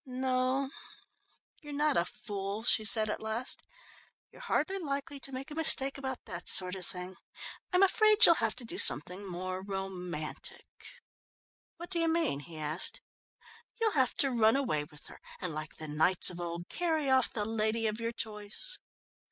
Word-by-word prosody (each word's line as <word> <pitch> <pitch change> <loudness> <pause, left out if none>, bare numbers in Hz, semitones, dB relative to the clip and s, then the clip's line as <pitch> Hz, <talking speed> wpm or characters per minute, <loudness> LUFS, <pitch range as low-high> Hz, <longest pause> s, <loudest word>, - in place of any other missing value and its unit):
"No, 260 0 -1 0.9
you're 295 - -10
not 295 0 +1
a 170 - +2
fool," 200 +2 -6
she 220 - +2
said 215 +1 +2
at 210 - -4
last. 220 +3 -1 0.7
"You're - - -15
hardly 390 -5 -1
likely 280 -3 -5
to 270 - -6
make 270 +3 -7
a - - -5
mistake 275 -3 +5
about 265 -2 -6
that 180 -5 0
sort 180 -1 +8
of 185 -2 -6
thing. 180 0 -8 0.5
I'm 365 +1 +4
afraid 430 +3 +6
you'll - - +8
have 225 -1 0
to 245 - -9
do - - -4
something 180 +7 +3
more 185 +1 -5
romantic." 185 -5 -6 1.1
"What 345 +2 -10
do 345 - 0
you 330 - +1
mean?" 325 - 0
he 160 +2 -11
asked. 155 +3 +1 0.8
"You'll 450 -1 +2
have 260 -7 +1
to 275 - +1
run 225 -1 +3
away 155 - -1
with 150 +1 -17
her; - - -12 0.2
and 180 -4 -4
like 155 0 -7
the 155 - -8
knights 160 +5 +3
of 175 0 -8
old 170 +1 -6
carry 320 -4 -1
off 260 -2 +3
the 210 -2 -3
lady 220 +1 -1
of 215 +1 -2
your 230 0 -3
choice." 215 - -6
225 Hz, 175 wpm, -30 LUFS, 185-275 Hz, 1.1 s, sort